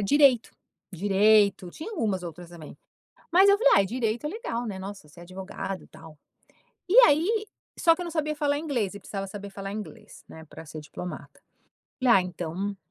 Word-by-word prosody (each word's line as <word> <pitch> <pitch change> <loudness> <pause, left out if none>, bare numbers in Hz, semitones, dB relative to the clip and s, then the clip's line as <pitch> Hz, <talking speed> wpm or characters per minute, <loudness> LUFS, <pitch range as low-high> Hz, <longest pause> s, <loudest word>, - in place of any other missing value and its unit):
ad - - -1
direito 270 +1 +4 0.4
direito, 200 0 +3
tinha 320 - -8
algumas 205 - -1
outras 175 +1 -9
também. 165 -4 -11 0.6
Mas 375 +3 +6
eu 400 0 +6
falei - - +5
ai 195 - +4
direito 230 +3 -2
é - - -1
legal, 335 - -4
né, 200 -4 -5
nossa 195 -4 -8
ser 150 +3 -17
advogado 190 +1 -6
e - - -17
tal. 155 -2 -14 0.7
E 415 - +4
aí 410 +9 +2 0.3
só 330 -1 +5
que 360 - -8
eu - - -4
não 340 - -6
sabia 305 -1 -1
falar 290 -1 0
inglês 245 - -2
e - - -8
precisava 195 0 -6
saber 200 +1 -8
falar 195 0 -6
inglês, 210 0 -9
né, 160 0 -12
pra 160 - -12
ser 155 0 -8
diplomata. 175 +4 -9 0.6
Falei: 250 -2 +5
"Ah 190 - +4
então", 180 +3 -4
205 Hz, 190 wpm, -26 LUFS, 185-290 Hz, 0.7 s, Mas